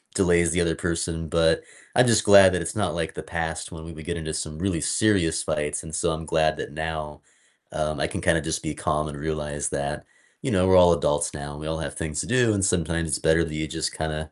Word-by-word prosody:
delays 85 -3 +3
the 90 - +1
other 85 -1 +1
person, 85 -2 -3
but 80 0 +3 0.3
I 125 - +6
just 115 -3 +3
glad 100 -2 +8
that 90 - 0
it's 85 - -5
not - - -1
like - - -3
the - - -7
past 80 0 -4
when 80 -2 -9
we 85 - -9
would 80 0 -10
get 85 -1 -3
into 80 -1 -5
some 75 0 -4
really 90 -4 -1
serious 85 -4 +2
fights, 75 -1 -2
and 80 -1 -10
so, 80 - 0
I'm 80 0 -4
glad 80 0 +1
that - - -6
now, 80 -2 -5 0.5
um, 75 -1 -2
I - - +1
can - - -5
kinda - - +2
just - - -2
be 75 -2 -3
calm 75 +2 -1
and 75 -1 -7
realize 75 -1 -3
that, 70 +1 -3 0.4
you - - -2
know, 95 -1 +3
we're 95 - +5
all 90 -1 +7
adults 75 -3 0
now 70 -1 -6
and 75 - -9
we 75 - -5
all 80 0 -2
have 70 -3 -4
things 75 -2 -4
to - - -5
do, 120 -2 +3
and 100 -2 0
sometimes 85 -2 0
it's 70 - 0
better 80 +1 +3
that 80 - -7
you 80 0 -2
just - - -2
kinda 80 0 -4
80 Hz, 250 wpm, -25 LUFS, 75-85 Hz, 0.5 s, glad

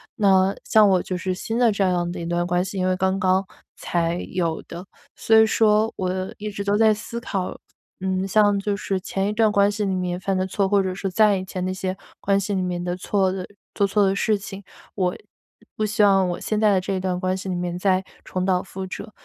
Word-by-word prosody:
那 195 -3 +3
像 215 -2 +5
我 185 -2 +3
就 185 - -4
是 185 +1 -2
新 225 +5 -4
的 235 -3 +4
这 200 -1 0
样 175 -2 0
的 175 - -6
一 170 - -5
段 175 +1 0
关 175 0 +1
系， 195 - -6
因 185 0 0
为 185 - +2
刚 190 +1 0
刚 190 0 +2 0.3
才 170 0 -1
有 170 -3 -1
的， 175 +3 -8 0.3
所 225 - +2
以 220 - +8
说 215 0 +3
我 185 0 -2
一 210 0 -5
直 200 0 -5
都 200 +1 +1
在 220 -1 +5
思 230 +3 -6
考， 195 -6 -4 0.4
嗯， 190 0 -1
像 205 0 +3
就 200 0 -1
是 195 -2 -2
前 195 +1 -2
一 210 - -1
段 215 -1 +3
关 200 0 +4
系 205 0 -2
里 190 -1 0
面 180 -1 -2
犯 190 0 -1
的 185 - 0
错， 195 +1 0
或 200 -1 +4
者 185 -1 -2
是 195 0 -3
再 210 +1 +4
以 185 - -4
前 185 -1 -5
那 185 - -2
些 185 0 -3 0.3
关 195 0 +2
系 200 +1 -2
里 190 - 0
面 180 -1 -2
的 175 0 -2
错 190 0 +1
的 185 -1 -4 0.3
做 200 - +2
错 205 0 +2
的 195 0 +1
事 215 +1 +1
情， 200 0 -9 0.3
我 180 -3 0 0.6
不 215 - -2
希 215 +1 +1
望 195 -2 +4
我 175 - -3
现 215 -1 -2
在 215 -1 +4
的 190 - +3
这 195 - -3
一 190 - -1
段 185 -1 -2
关 185 0 0
系 190 0 -6
里 180 - -1
面 175 0 -3
再 185 0 +1 0.2
重 185 0 -3
蹈 185 -1 +2
覆 190 0 -7
辙， 215 +3 -8
190 Hz, 265 characters per minute, -23 LUFS, 185-205 Hz, 0.6 s, 以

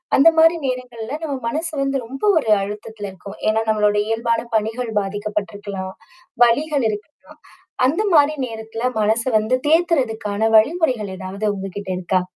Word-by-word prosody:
அந்தமாரி 325 +3 +6
நேரங்கள்ல 250 -1 -4
நம்ம 290 -3 -2
மனசு 320 +7 -2
வந்து 275 0 0
ரொம்ப 270 +4 -9
ஒரு 280 -8 0
அழுத்தத்தில 205 +1 -6
இருக்கும். 195 +2 -11
ஏன்னா, 220 +1 +2
நம்மளோட 210 -1 +2
இயல்பான 230 +1 0
பணிகள் 225 +2 -1
பாதிக்கப்பட்டு 205 +1 -4
இருக்கலாம். 200 -2 -6 0.5
வலிகள் 285 +2 +1
இருக்கலாம். 210 +7 -9 0.5
அந்தமாரி 310 -2 +3
நேரத்தில 225 +1 -6 0.2
மனச 220 +2 +2 0.2
வந்து 220 +4 +1
தேத்துறதுக்கான 240 - +1
வழிமுறைகள் 250 - +1
ஏதாவது 190 +2 -5
உங்கக்கிட்ட 195 0 -6
இருக்கா? 185 +1 0
225 Hz, 125 wpm, -20 LUFS, 205-275 Hz, 0.5 s, அந்தமாரி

